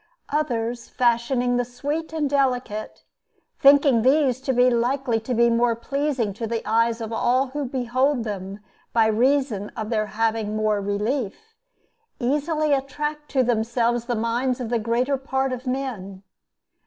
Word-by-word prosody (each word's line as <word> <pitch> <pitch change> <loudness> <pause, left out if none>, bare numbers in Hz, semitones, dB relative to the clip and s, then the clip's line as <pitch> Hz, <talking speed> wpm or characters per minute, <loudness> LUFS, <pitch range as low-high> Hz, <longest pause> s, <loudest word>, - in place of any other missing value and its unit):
Others, 240 -5 -2
fashioning 245 +1 +1
the 245 - +1
sweet 285 +7 -4
and 315 -2 -1
delicate, 250 -6 -1 0.6
thinking 280 -3 +6
these 260 0 +3
to 265 - -1
be 250 0 +4
likely 245 0 +1
to 240 +3 -3
be 235 +1 +4
more 235 0 +2
pleasing 260 -2 -2
to 225 +3 -4
the 230 0 -3
eyes 230 +1 +2
of 225 0 -5
all 255 +4 +1
who 290 +2 -3
behold 255 +1 0
them 200 -1 -6 0.3
by 225 -1 +4
reason 230 -2 +1
of 220 0 -4
their 215 -2 0
having 220 -1 -1
more 215 -1 +1
relief, 215 - -3 0.7
easily 300 +4 0
attract 295 +2 -3
to 265 -2 +2
themselves 235 0 0
the 240 -1 -1
minds 240 +3 -1
of 245 -3 -4
the 235 -1 +1
greater 240 +5 0
part 265 0 -1
of 255 +1 -7
men. 220 -8 -4
245 Hz, 150 wpm, -23 LUFS, 225-270 Hz, 0.7 s, thinking